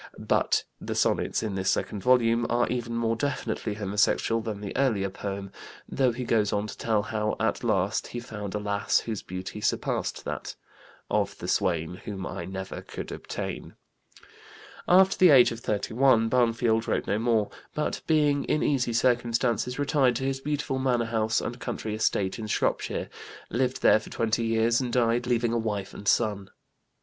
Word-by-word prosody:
But - - +1 0.2
the - - -4
sonnets - - +1
in 110 -3 -2
this 95 0 0
second 100 - -1
volume 120 -1 +3
are 120 +1 +2
even 120 -1 -2
more 115 -1 +1
definitely 115 -5 -2
homosexual 105 +2 +1
than 110 -2 -5
the 100 -1 -6
earlier 110 -8 +1
poem, 100 0 -5 0.4
though 130 -2 +2
he 125 +2 -5
goes 110 -4 +1
on 105 0 0
to 105 - -7
tell 110 -3 0
how 105 0 -1
at 110 +1 0
last 100 -2 0
he 120 - -5
found 105 -4 -6
a - - 0
lass 100 0 +1
whose 110 -4 -4
beauty 95 +3 -7
surpassed - - -1
that - - -5 0.6
"of - - 0
the - - -7
swain 85 -1 0
Whom 100 -4 -5
I 85 - -5
never 95 +1 -6
could - - -7
obtain." - - -6 1.1
After 190 +2 +5
the 185 - +7
age 130 -5 +7
of 115 - -5
31 115 +2 +2
Barnfield 115 -2 +2
wrote - - 0
no 100 +3 0
more, 115 -3 +1 0.2
but, 150 - -2
being 150 -3 +3
in 150 - +1
easy 130 -4 +1
circumstances, 120 0 +1
retired 140 -3 +2
to 130 - -3
his 135 0 -1
beautiful 145 -1 -2
manor 125 -3 +1
house 110 -1 0
and 120 +1 -5
country 115 -4 -4
estate 105 -2 0
in 110 - -5
Shropshire, - - -1 0.4
lived 130 +2 -1
there - - +6
for 110 - -12
twenty 115 0 0
years 115 +2 +2
and 125 -2 -3
died 120 0 +1
leaving 120 -1 +1
a 120 - +1
wife 105 -3 -3
and 100 - -9
son. 105 -4 +1
115 Hz, 175 wpm, -27 LUFS, 105-125 Hz, 1.1 s, the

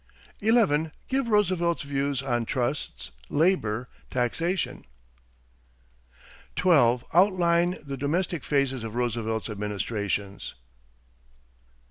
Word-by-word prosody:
11. 200 -9 +3 0.2
Give 265 -1 0
Roosevelt's 185 -6 +2
views 140 -1 -1
on 120 -3 0
trusts, 125 +4 -3 0.2
labor, 125 - +1 0.2
taxation. 165 +9 -1 1.7
12. 130 -10 +4
Outline 175 -1 +3
the 140 -2 -5
domestic 160 +3 -1
phases 135 -4 0
of 115 0 -6
Roosevelt's 115 -2 -1
administrations. 105 - -3
140 Hz, 80 wpm, -27 LUFS, 120-175 Hz, 1.7 s, 12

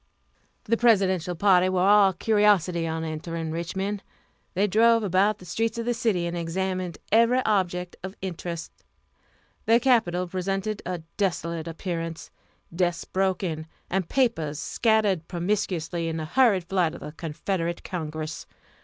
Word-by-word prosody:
The 230 +2 +1
Presidential 190 -7 +3
party 185 0 +4
were 185 -1 +1
all 205 -1 +6
curiosity 190 -4 +2
on 160 0 -2
entering 160 +1 -4
Richmond. 190 +5 -3 0.5
They 195 +3 +3
drove 230 +3 +4
about 200 +2 +2
the 180 - -14
streets 225 +6 -1
of 230 - -3
the 240 - +1
city, 215 -7 0
and 170 0 -3
examined 185 +1 -2
every 235 +4 +4
object 180 -4 0
of 190 +1 -7
interest. 170 -3 -5 1.0
The 230 +1 +6
Capitol 220 -9 +2
presented 195 +3 -2
a 180 -3 -4
desolate 170 -4 -1
appearance 165 -1 -5 0.4
desks 175 -1 0
broken, 185 -4 -1 0.2
and 185 -1 -1
papers 165 - +1
scattered 210 -3 +1
promiscuously 175 -2 -1
in 165 0 -2
the 160 - -3
hurried 205 0 +3
flight 175 -2 0
of - - -11
the - - -7
Confederate 170 +2 -3
Congress. 155 -2 -5
185 Hz, 135 wpm, -26 LUFS, 170-205 Hz, 1.0 s, all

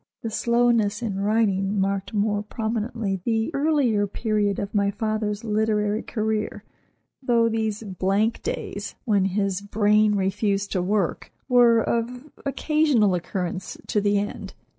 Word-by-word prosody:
This 225 -1 -3
slowness 235 -2 +2
in 200 -4 -2
writing 200 -1 +1
marked 195 0 -1
more 205 -1 0
prominently 220 -2 -3
the 225 0 0
earlier 275 -8 +2
period 205 -1 0
of 200 - -4
my 200 -1 +2
father's 215 0 -2
literary 215 -1 0
career, 215 -2 -2 0.6
though 235 -3 +3
these 220 -1 -1
"blank 200 +3 0
days," - - -4
when 205 -5 +2
his 195 0 -1
brain 210 +1 +3
refused 200 +1 0
to 185 - 0
work, 195 -1 -1 0.2
were 240 -3 +5
of 245 +5 -3 0.2
occasional 275 -8 +2
occurrence 180 +1 -3
to 210 - +2
the 205 0 +2
end. 205 +1 -4
210 Hz, 130 wpm, -24 LUFS, 200-225 Hz, 0.6 s, were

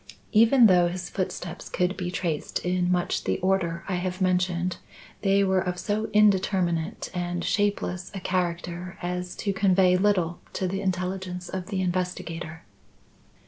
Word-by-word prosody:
Even 230 +3 +6
though 180 -4 +6
his 180 +1 -5
footsteps 180 -2 -4
could 180 +2 0
be 180 -1 -3
traced 170 -4 -2
in 180 0 +1
much 180 -1 0
the - - +1
order 175 -3 0
I 185 -3 -1
have 180 +1 -3
mentioned, 180 -1 +1 0.4
they 200 0 +3
were 190 -1 +2
of 180 -1 -2
so 215 +3 -1
indeterminate 190 -3 +2
and 175 -1 -2
shapeless 200 -3 0
a - - -3
character 180 0 -2
as 180 0 -3
to 200 - -2
convey 190 -2 +4
little 180 -4 +1
to 185 - -1
the 195 +2 -2
intelligence 180 -1 -3
of 185 -1 -4
the 195 -2 -2
investigator. 175 -3 -3
180 Hz, 145 wpm, -26 LUFS, 175-190 Hz, 0.4 s, Even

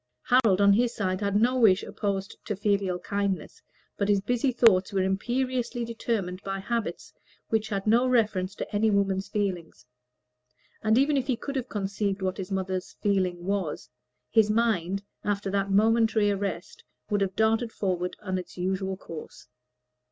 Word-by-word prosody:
Harold, 230 -7 +4
on 200 0 +6
his 240 +3 +2
side, 185 -2 -1
had 200 -1 0
no 245 +5 +3
wish 205 -4 +5
opposed 200 -1 -3
to 210 - -3
filial 200 -2 0
kindness, 200 +1 -3 0.4
but 200 0 0
his 205 -1 +4
busy 245 +6 0
thoughts 220 -6 +4
were 190 -1 +1
determined 235 -3 -2
by 195 0 -3
habits 230 +3 -3 0.4
which 220 -1 0
had 195 -2 -2
no 235 +4 +4
reference 210 -6 +1
to 210 - -5
any 220 +2 +3
woman's 195 -1 +1
feelings; 185 -10 -3 1.0
and 220 +1 +3
even 280 +2 +3
if 265 -1 -1
he 260 - +2
could 280 +3 -6
have 255 -2 -2
conceived 200 -1 -2
what 185 0 -1
his 190 -1 -6
mother's 190 -1 -2
feeling 185 -4 -1
was, 190 -6 -2 0.4
his 220 -2 +4
mind, 200 -4 +1 0.2
after 200 -1 -1
that 195 0 0
momentary 220 +1 +3
arrest, 195 -3 -4 0.3
would 205 -1 +1
have 190 -1 -1
darted 225 +1 +2
forward 180 -4 -2
on 185 -2 -1
its 180 - -10
usual 190 +1 -2
course. 165 -4 -10
200 Hz, 160 wpm, -27 LUFS, 190-225 Hz, 1.0 s, on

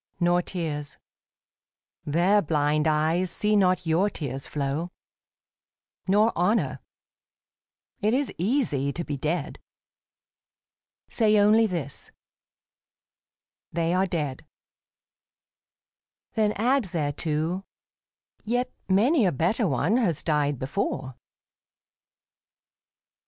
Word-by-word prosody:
Nor 175 0 +3
tears. 150 -5 -5 1.1
Their 175 +7 +3
blind 150 -1 +1
eyes 160 +4 +1
see 210 +4 +1
not 185 -3 +2
your 170 +6 +2
tears 135 -7 -5
flow. 145 +4 -2 1.2
Nor 210 +4 +3
honour. 175 - +1 1.2
It 215 +4 +1
is 280 0 -1
easy 175 - 0
to 170 - -3
be 145 - -4
dead. 150 +2 -3 1.5
Say 215 -2 +2
only 215 +2 +5
this, 165 -8 -5 0.8
" - - -68
They 165 +1 0
are 190 +1 +2
dead." 150 -7 -3 1.9
Then 215 -2 +1
add 250 +3 +1
thereto, 160 +1 -2 0.4
" - - -61
Yet 245 +3 -1 0.2
many 225 - +4
a - - +2
better 190 - +1
one 155 - +1
has 175 - 0
died 145 -3 +1
before." 130 -2 -3
175 Hz, 95 wpm, -26 LUFS, 150-210 Hz, 1.9 s, only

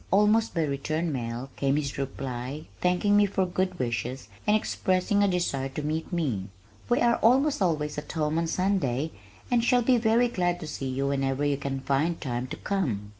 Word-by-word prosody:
Almost 210 +3 +3
by 165 - +2
return 155 +3 -1
mail 120 +1 -4
came 140 0 +1
his 140 -2 -2
reply 135 +1 -4
thanking 180 +3 +2
me 205 0 +5
for 195 -1 0
my 180 - -8
good 185 0 -1
wishes 125 0 -3 0.2
and 210 - +5
expressing 190 -1 +1
a 200 - +4
desire 175 -8 0
to 145 +3 -5
meet 155 +4 -2
me. 130 - -1 0.4
"We 240 - +3
are 235 -1 +4
almost 265 +3 +3
always 150 -5 0
at 150 - -8
home 155 0 0
on 165 - 0
Sunday 160 -6 0 0.4
and 240 -1 +3
shall 245 0 +3
be 250 +1 +4
very 230 +2 +3
glad 175 -6 0
to - - -5
see 135 -3 -4
you 135 +1 -1
whenever 135 0 0
you 145 -1 +1
can 135 -1 -3
find 140 +5 0
time 125 -2 -3
to - - -6
come." 120 - -2
155 Hz, 195 wpm, -27 LUFS, 135-195 Hz, 0.4 s, me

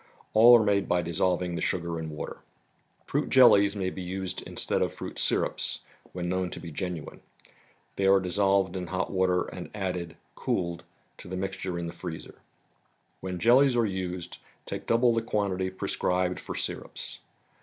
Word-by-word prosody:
All 120 +2 +9
are - - +2
made 100 -1 +1
by 90 0 +2
dissolving 90 +2 0
the 85 - -3
sugar 85 -2 -1
in 80 -1 -4
water. 75 -1 -6 0.7
Fruit - - -1
jellies 100 -6 +6
may 95 -2 -1
be 95 - -6
used 95 +1 -4
instead - - -2
of - - +1
fruit - - -7
syrups, - - 0 0.3
when 90 -1 -4
known 90 0 0
to - - -7
be 85 - -8
genuine. 90 -1 -5 0.8
They 95 - +2
are 95 0 +6
dissolved 95 +1 +1
in 90 -1 -4
hot 95 +1 -2
water, 95 -1 +2
and - - -8
added, 90 -4 -3 0.2
cooled, 85 -2 -2 0.3
to - - -11
the 95 +1 -4
mixture 95 -1 -3
in 85 - -3
the 85 - -5
freezer. 85 -2 -8 0.8
When 95 -1 -4
jellies 125 +6 +5
are 120 -1 +3
used 90 -3 -4 0.3
take - - -6
double 120 +1 +4
the 115 - +1
quantity 100 -4 -1
prescribed 90 -1 -1
for - - -6
syrups. - - -5
95 Hz, 165 wpm, -28 LUFS, 90-100 Hz, 0.8 s, All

